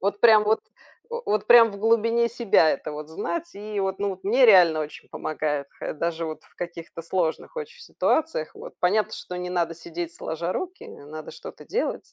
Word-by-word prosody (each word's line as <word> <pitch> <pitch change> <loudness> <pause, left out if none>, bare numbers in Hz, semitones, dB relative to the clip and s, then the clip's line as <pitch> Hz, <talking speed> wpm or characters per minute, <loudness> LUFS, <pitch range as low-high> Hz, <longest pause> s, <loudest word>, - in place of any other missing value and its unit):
Вот 200 +1 -1
прям 220 -2 +7
вот 220 +1 +2 0.5
о 475 - -3
вот 210 0 0
прям 235 -1 +8
в 200 - -9
глубине 230 +2 +2
себя 220 -9 +4
это - - -3
вот 150 0 -7
знать, 340 - -4
и 210 0 -6
вот, 190 0 -2
ну, 205 - 0
вот 190 0 -9
мне 245 +5 +5
реально 175 -7 +7
очень 150 0 -7
помогает, 150 -2 -2
хе - - -4
даже 165 +1 -2
вот 155 -1 -6
в - - -26
каких-то 170 -1 -7
сложных 170 -1 -1
очень 475 +1 -7
ситуациях. 315 - 0
Вот, - - -10
понятно, 205 +4 +2
что 180 - -7
не 180 0 -4
надо 170 -2 0
сидеть 170 0 -6
сложа 170 +3 -3
руки, 370 0 -5
не 145 - -12
надо 155 +1 -8
что-то - - -11
делать, 475 +4 -2
190 Hz, 200 wpm, -25 LUFS, 165-230 Hz, 0.5 s, прям